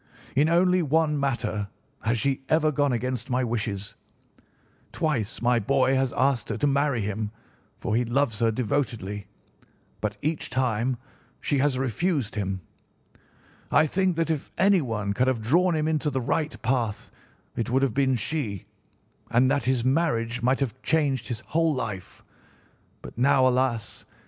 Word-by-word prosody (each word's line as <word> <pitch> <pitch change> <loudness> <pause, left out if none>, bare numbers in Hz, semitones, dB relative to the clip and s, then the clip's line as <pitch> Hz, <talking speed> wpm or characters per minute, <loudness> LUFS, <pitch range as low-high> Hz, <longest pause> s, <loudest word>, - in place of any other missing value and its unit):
In 145 +4 +4
only 180 +2 +4
one 155 -1 +2
matter 120 -6 -1 0.3
has 115 +1 +1
she 135 +3 0
ever 155 -1 +3
gone 145 -1 +1
against 125 +1 -2
my 130 0 +1
wishes. 105 -4 -3 1.0
Twice 135 - -2
my 120 0 +3
boy 130 +4 +2
has 135 -1 +1
asked 130 -3 +1
her - - -2
to - - 0
marry 140 -3 +2
him, 105 +1 -2 0.5
for 105 - -2
he 120 - +2
loves 120 -2 0
her 115 - +3
devotedly, 110 -4 -2 0.7
but 105 0 -3
each 155 +1 -1
time 125 -1 0 0.4
she 140 - 0
has 135 -1 +2
refused 135 - -1
him. 95 -2 -3 1.1
I - - +5
think 185 +3 +1
that 165 0 0
if 155 -3 -3
anyone 125 - +2
could 125 +5 +1
have 130 -3 +1
drawn 170 +10 +2
him 155 0 0
into 155 -1 +1
the 135 -2 -1
right 150 +5 -1
path 115 -3 -1 0.4
it 115 - -2
would 130 +2 +2
have 135 -5 +1
been 135 -1 +2
she, 115 - -3 0.6
and 130 +3 +3
that 140 -4 0
his 125 -2 +1
marriage 120 -5 +1
might 130 +3 +2
have 130 -2 -2
changed 145 -6 +1
his 120 -2 -4
whole 160 +2 +1
life; 105 -7 -5 0.8
but - - -9
now, 130 0 +5
alas! 125 -4 0
130 Hz, 155 wpm, -26 LUFS, 115-145 Hz, 1.1 s, I